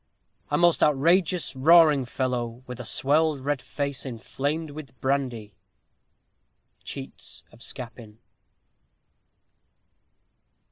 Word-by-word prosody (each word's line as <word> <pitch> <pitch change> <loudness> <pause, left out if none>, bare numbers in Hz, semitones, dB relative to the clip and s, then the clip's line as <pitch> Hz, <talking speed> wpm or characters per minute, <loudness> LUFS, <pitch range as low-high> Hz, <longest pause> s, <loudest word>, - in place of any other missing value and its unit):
_ - - -48 0.5
A - - +1
most 175 -1 +4
outrageous, 165 +3 +3
roaring 150 -1 +6
fellow, 120 -1 -3
with 125 -1 -8
a 125 - -6
swelled 150 +3 +2
red 145 -2 0
face 140 -1 -3
inflamed 145 +5 -3
with 145 -3 -10
brandy. 125 -6 -1 1.3
_Cheats - - -6
of 120 - -17
Scapin. 115 -4 -8
135 Hz, 95 wpm, -26 LUFS, 125-155 Hz, 1.3 s, roaring